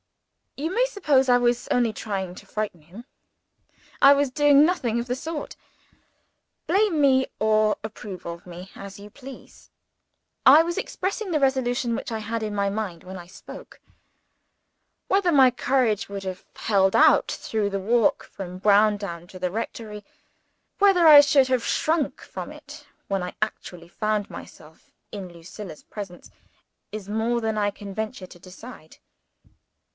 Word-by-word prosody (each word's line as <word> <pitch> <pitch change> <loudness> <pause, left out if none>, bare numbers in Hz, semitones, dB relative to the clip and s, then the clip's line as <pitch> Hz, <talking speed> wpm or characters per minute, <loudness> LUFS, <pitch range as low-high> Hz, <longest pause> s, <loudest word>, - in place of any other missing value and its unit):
You 320 +6 -3
may - - +3
suppose 290 - +2
I 245 - +6
was 245 0 0
only 240 -3 +1
trying 190 -5 -4
to - - -13
frighten 210 -6 -4
him. 185 +10 -13 1.0
I 275 - +9
was 285 -2 +1
doing 290 +1 +5
nothing 250 -10 0
of 235 - -3
the 250 - -1
sort. 310 +3 -6 1.1
Blame 395 -5 +2
me, 265 -2 +4
or 215 0 +2
approve 205 -4 -8
of 170 0 -7
me, 180 +2 -10
as 200 0 -10
you 205 +1 -11
please, 265 +3 -13 0.8
I 290 +4 +9
was 345 +2 -4
expressing 400 0 -3
the 310 - +1
resolution 255 -3 0
which 235 - -5
I 225 - -2
had 225 +1 -4
in 210 -1 -3
my 200 -1 0
mind 195 -5 -4
when 185 +1 -9
I 175 -1 -11
spoke. 185 - -12 1.3
Whether 385 -2 +2
my 265 -4 +6
courage 245 -5 0
would 200 -1 -6
have 185 -1 -6
held 195 -3 +2
out - - +5
through 215 -2 -2
the 195 0 -3
walk 225 +3 +2
from 180 -2 -8
Browndown 200 -4 +2
to 185 - -12
the 180 -1 -2
rectory 215 0 -6 0.8
whether 390 -4 +5
I 295 -2 +11
should 280 -2 +4
have 255 -2 0
shrunk 315 -2 0
from - - -8
it - - -13 0.2
when 195 -1 -1
I 180 - -6
actually 180 -5 -5
found 215 +2 -2
myself 160 0 -13 0.2
in 190 -4 -7
Lucilla's 170 0 -10
presence 195 -4 -9 0.6
is 210 -2 -7
more 225 +3 0
than 220 -1 -2
I 205 -1 +1
can 200 -1 -9
venture 220 -2 -5
to 175 - -15
decide. 185 -1 -13
215 Hz, 155 wpm, -24 LUFS, 195-265 Hz, 1.3 s, I